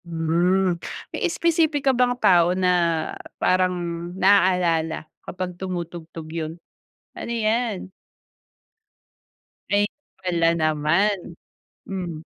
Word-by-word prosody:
Hmm, 170 +2 +1 0.3
may - - -4
espesipika 315 -5 +2
bang 245 0 +2
tao 180 -4 +4
na 185 -1 +2 0.7
parang 185 0 +2 0.4
na-aalala 180 -5 +3 0.2
kapag 180 0 -5
tumutugtog 170 -3 -5
yun? 160 -1 -3 0.6
Ano - - -6
yan? 225 -4 -1 1.8
Ay, 205 0 +3 0.4
wala 170 -2 +3
naman. 155 +6 +2 0.7
Hmm. 175 -5 -5
180 Hz, 80 wpm, -23 LUFS, 170-205 Hz, 1.8 s, tao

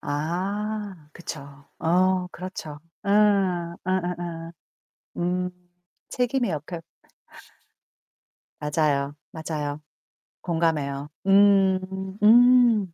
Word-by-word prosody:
아. 190 +3 -3
그쵸. 165 -4 -7 0.4
어 185 +2 +2
그렇죠. 160 -5 -7 0.2
어. - - -4 0.8
어어어. 175 -2 -3 0.6
음. 180 +1 -1 0.6
책임의 245 -2 0
역할. 165 +2 -5 1.8
맞아요. 145 -1 0 0.2
맞아요. 150 -2 -4 0.6
공감해요. 150 -5 -1 0.2
음. 190 -1 +3
음. 235 -4 +6
180 Hz, 135 characters per minute, -25 LUFS, 155-195 Hz, 1.8 s, 음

